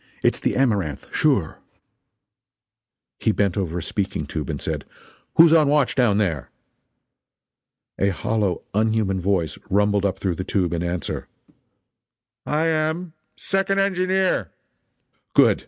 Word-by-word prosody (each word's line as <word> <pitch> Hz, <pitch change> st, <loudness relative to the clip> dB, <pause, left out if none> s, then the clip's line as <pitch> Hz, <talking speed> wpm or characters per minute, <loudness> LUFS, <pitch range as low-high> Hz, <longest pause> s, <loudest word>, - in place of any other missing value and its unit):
It's -, -, +2 dB
the -, -, -1 dB
Amaranth, 100 Hz, -, -1 dB
sure!" -, -, +1 dB, 1.6 s
He 110 Hz, -, +2 dB
bent 100 Hz, -3 st, 0 dB
over 90 Hz, -4 st, -2 dB
a 85 Hz, -, -3 dB
speaking 95 Hz, -6 st, -2 dB
tube 75 Hz, -1 st, -5 dB
and -, -, -3 dB
said: -, -, -3 dB, 0.5 s
"Who's 165 Hz, 0 st, +7 dB
on 155 Hz, -3 st, +5 dB
watch 145 Hz, -2 st, +3 dB
down 120 Hz, -6 st, +3 dB
there?" 85 Hz, -10 st, -1 dB, 1.5 s
A 100 Hz, -, +3 dB
hollow, 100 Hz, 0 st, -1 dB
unhuman 110 Hz, -3 st, +1 dB
voice 90 Hz, -4 st, 0 dB
rumbled 100 Hz, 0 st, +2 dB
up 95 Hz, -1 st, 0 dB
through 95 Hz, -3 st, -2 dB
the 95 Hz, -, -2 dB
tube 90 Hz, -3 st, 0 dB
in 85 Hz, -, -1 dB
answer: 85 Hz, -1 st, -3 dB, 1.2 s
"I 155 Hz, +2 st, +1 dB
am. 160 Hz, +1 st, -1 dB, 0.2 s
Second 195 Hz, 0 st, 0 dB
engineer." 190 Hz, -1 st, +1 dB, 0.9 s
"Good! -, -, +5 dB
105 Hz, 125 wpm, -23 LUFS, 90-155 Hz, 1.6 s, Who's